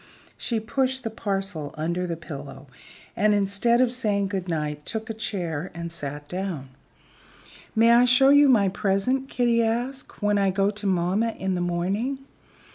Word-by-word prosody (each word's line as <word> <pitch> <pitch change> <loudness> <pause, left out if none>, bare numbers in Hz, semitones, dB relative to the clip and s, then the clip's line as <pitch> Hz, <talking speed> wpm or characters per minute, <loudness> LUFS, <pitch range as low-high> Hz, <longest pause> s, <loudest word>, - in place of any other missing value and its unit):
She 230 -2 -2
pushed 260 +3 -1
the 225 - -3
parcel 195 -8 -3
under 170 +3 -1
the 170 -1 -3
pillow 140 -4 -9 0.5
and, 210 0 +3
instead 205 +5 +2
of 250 -1 +2
saying 205 -5 0
good 190 -2 -3
night, 150 -3 -3
took 220 +4 -4
a - - -4
chair 180 -7 -3
and 170 0 -5
sat 145 -2 -6
down. 180 -7 -4 1.1
"May 230 +1 +5
I 240 +1 +6
show 270 +3 +6
my 220 -7 +5
present," 210 +7 0
Kitty 240 -2 +2
asked, 240 +2 -3
"when 205 0 +3
I 195 -1 +3
go 195 +2 +1
to 205 0 -4
mamma 190 +5 +1
in 190 0 -1
the 180 - -1
morning?" 190 +10 -1
200 Hz, 160 wpm, -25 LUFS, 175-230 Hz, 1.1 s, I